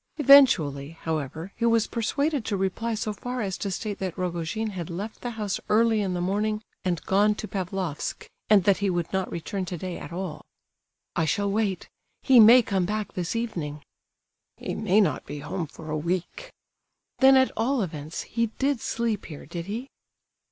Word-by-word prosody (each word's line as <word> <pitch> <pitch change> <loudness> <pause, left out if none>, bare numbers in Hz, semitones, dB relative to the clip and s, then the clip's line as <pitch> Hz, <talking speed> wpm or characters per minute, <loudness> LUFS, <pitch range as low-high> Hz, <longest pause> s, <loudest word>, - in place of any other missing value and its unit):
Eventually, 165 - +5
however, 160 +3 -4
he 235 - -1
was 230 -1 +3
persuaded 280 +4 -1
to 205 - -1
reply 205 +5 -1
so 215 -1 -2
far 250 +5 -5
as 195 -3 -2
to 200 - -2
state 205 +2 -4
that 185 -2 -4
Rogojin 180 +5 -2
had 180 -3 -5
left 200 +6 -6
the 245 - -3
house 205 -3 -2
early 220 0 +4
in 190 -3 -1
the - - -2
morning 210 +4 -1 0.2
and 175 -4 -1
gone 205 +2 +3
to 215 - -6
Pavlofsk, 185 -5 -3 0.2
and 205 -3 +6
that 200 0 +4
he 200 -1 0
would 175 -1 -2
not 190 -1 -1
return 190 +4 -3
today 180 0 -5
at - - -9
all. 175 -3 -5 0.7
"I 160 - +1
shall 200 +6 0
wait; 205 -3 -1 0.4
he 260 -3 +6
may 235 +3 +9
come 190 -4 0
back 210 -1 -3
this 180 +3 -3
evening." 165 -11 -3 0.7
"He - - -4
may 210 0 +3
not 155 -9 0
be 145 - -7
home 155 +3 -4
for 155 +1 -9
a 155 - 0
week." 180 - -3 0.7
"Then, 265 0 +7
at 260 0 +4
all 245 0 +1
events, 155 -2 -5
he 230 0 -1
did 275 -3 0
sleep 225 -3 -2
here, 150 -4 -9
did 170 0 -6
he?" 230 +6 -4
195 Hz, 180 wpm, -26 LUFS, 170-225 Hz, 0.7 s, may